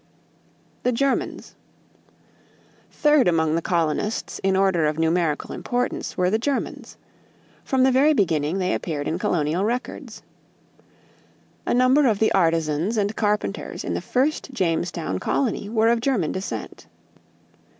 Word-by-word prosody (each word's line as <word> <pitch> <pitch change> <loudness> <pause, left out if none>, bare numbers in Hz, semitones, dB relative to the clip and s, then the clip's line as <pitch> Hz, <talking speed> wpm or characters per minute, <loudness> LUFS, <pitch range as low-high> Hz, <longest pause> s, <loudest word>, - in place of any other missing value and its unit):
=The 250 - +1
Germans.= 275 +3 -1 1.4
Third 295 -5 +3
among 160 -2 +2
the 165 - +1
colonists 170 +6 -1
in 190 0 +2
order 190 -5 +2
of 150 0 -2
numerical 165 -1 0
importance 245 0 -3
were 180 0 +2
the 220 - +1
Germans. 275 +3 -3 0.7
From 265 -2 +1
the 265 - +4
very 280 +4 +4
beginning, 165 - +1
they 185 -1 0
appeared 150 -4 -3
in 165 - -2
colonial 165 +1 0
records. 240 +4 -4 1.4
A - - +2
number 255 +3 +4
of 220 -4 +2
the 220 - +2
artisans 165 +3 +1
and 205 +1 0
carpenters 210 -1 -2
in - - -3
the - - -2
first 275 +2 -1
Jamestown 170 - -1
colony 225 -6 -1
were 225 0 +2
of 235 0 +2
German 230 - 0
descent. 190 +1 -6
195 Hz, 130 wpm, -23 LUFS, 165-245 Hz, 1.4 s, the